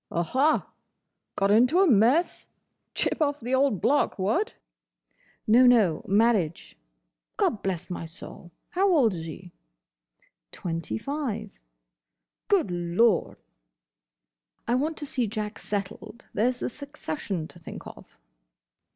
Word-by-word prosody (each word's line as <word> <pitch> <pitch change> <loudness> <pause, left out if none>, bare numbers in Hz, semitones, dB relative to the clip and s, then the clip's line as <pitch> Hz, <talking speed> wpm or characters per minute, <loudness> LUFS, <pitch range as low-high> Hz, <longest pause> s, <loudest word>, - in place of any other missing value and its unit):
"Aha! 260 - +1 0.7
Got 195 0 +2
into 250 - +4
a 390 - +6
mess? 255 - +3 0.5
Chip - - -1
of 290 -1 +1
the 245 +2 -4
old 260 - +2
block—what?" 280 - +1 0.9
"No, 245 +4 +6
no. 210 -10 +4
Marriage." 200 -5 +1 0.6
"Gobblessmysoul! 175 -4 -3 0.2
How 385 +2 +2
old 260 - +4
is 165 -2 -6
he?" 175 +3 -9 1.0
"Twenty 165 -10 -4
five." 225 - -4 1.0
"Good 370 - +2
Lord!" 175 +5 +1 1.3
"I 235 - +1
want 300 +5 0
to 295 - -5
see 250 -4 -1
Jack 210 0 -4
settled. 205 +3 -5
There 235 +4 +2
's 250 - -8
the - - -3
succession 200 - -5
to 175 - -15
think 165 - -9
of." - - -13
220 Hz, 110 wpm, -26 LUFS, 180-275 Hz, 1.3 s, a